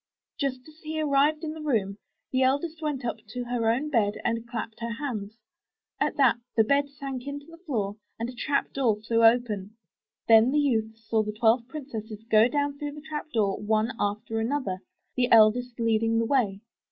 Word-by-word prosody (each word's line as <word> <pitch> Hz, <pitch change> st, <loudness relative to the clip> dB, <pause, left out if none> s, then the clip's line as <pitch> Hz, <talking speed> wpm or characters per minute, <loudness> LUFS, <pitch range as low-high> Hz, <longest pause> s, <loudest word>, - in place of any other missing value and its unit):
Just 265 Hz, -3 st, -2 dB
as 310 Hz, 0 st, -16 dB
he 315 Hz, 0 st, -4 dB
arrived 300 Hz, +1 st, +2 dB
in 310 Hz, -1 st, -3 dB
the 315 Hz, -, -8 dB
room, 215 Hz, -9 st, -1 dB, 0.3 s
the 260 Hz, -, +1 dB
eldest 285 Hz, +5 st, +1 dB
went 290 Hz, -5 st, -2 dB
up 235 Hz, -, -2 dB
to 245 Hz, +3 st, -5 dB
her 240 Hz, -2 st, 0 dB
own 270 Hz, +7 st, 0 dB
bed 215 Hz, -5 st, +2 dB
and 230 Hz, 0 st, -1 dB
clapped 225 Hz, -2 st, -5 dB
her 235 Hz, 0 st, -3 dB
hands; 230 Hz, -5 st, -5 dB, 0.6 s
at -, -, 0 dB
that 265 Hz, -4 st, +5 dB, 0.2 s
the 225 Hz, -, +5 dB
bed 280 Hz, +5 st, +2 dB
sank 275 Hz, -2 st, -6 dB
into 285 Hz, 0 st, -5 dB
the 330 Hz, +1 st, -14 dB
floor 210 Hz, -7 st, -2 dB, 0.2 s
and 230 Hz, -, -3 dB
a 250 Hz, -, -7 dB
trap 280 Hz, +3 st, -1 dB
door 250 Hz, -6 st, +2 dB
flew 230 Hz, +1 st, +1 dB
open. 225 Hz, -3 st, +2 dB, 0.5 s
Then 225 Hz, +1 st, +7 dB
the 290 Hz, -, +1 dB
youth 225 Hz, -6 st, 0 dB
saw 225 Hz, 0 st, 0 dB
the 210 Hz, 0 st, -3 dB
twelve 230 Hz, +2 st, +2 dB
princesses 225 Hz, -7 st, -7 dB
go 220 Hz, 0 st, +5 dB
down 285 Hz, +2 st, -1 dB
through 290 Hz, -1 st, -4 dB
the 300 Hz, -, -9 dB
trap 305 Hz, 0 st, -6 dB
door 205 Hz, -5 st, +1 dB
one 215 Hz, +2 st, +1 dB
after 215 Hz, +2 st, -1 dB
another, 225 Hz, -5 st, -1 dB, 0.4 s
the 250 Hz, -1 st, +1 dB
eldest 230 Hz, +2 st, +5 dB
lead 225 Hz, -1 st, +2 dB
ing 225 Hz, 0 st, +1 dB
the 230 Hz, -, +2 dB
way. 220 Hz, -7 st, +1 dB
240 Hz, 195 wpm, -27 LUFS, 220-280 Hz, 0.6 s, Then